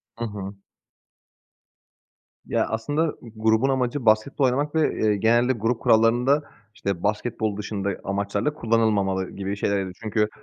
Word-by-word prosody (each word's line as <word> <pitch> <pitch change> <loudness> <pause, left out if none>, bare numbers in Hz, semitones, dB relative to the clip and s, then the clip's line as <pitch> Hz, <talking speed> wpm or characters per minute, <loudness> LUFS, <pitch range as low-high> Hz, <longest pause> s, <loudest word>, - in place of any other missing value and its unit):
Hı 120 - -4
hı. 100 -2 -6 1.9
Ya, - - 0
aslında 145 +8 0 0.2
g 120 - -11
grubun 110 +4 +2
amacı 130 0 -1
basketbol 110 +6 +3
oynamak 145 +4 0
ve, 160 -1 +2
eee, 105 -1 +3
genelde 120 +4 +3
grup 115 0 -1
kurallarında 120 +6 +3 0.3
işte 100 -6 -3
basketbol 110 0 -1
dışında 105 -1 -3
amaçlarla 100 +7 -1
kullanılmamalı 105 - +1
gibi 100 0 -4
şeylerdi. 100 -2 -1
Çünkü, 105 0 +1
110 Hz, 125 wpm, -24 LUFS, 100-125 Hz, 1.9 s, basketbol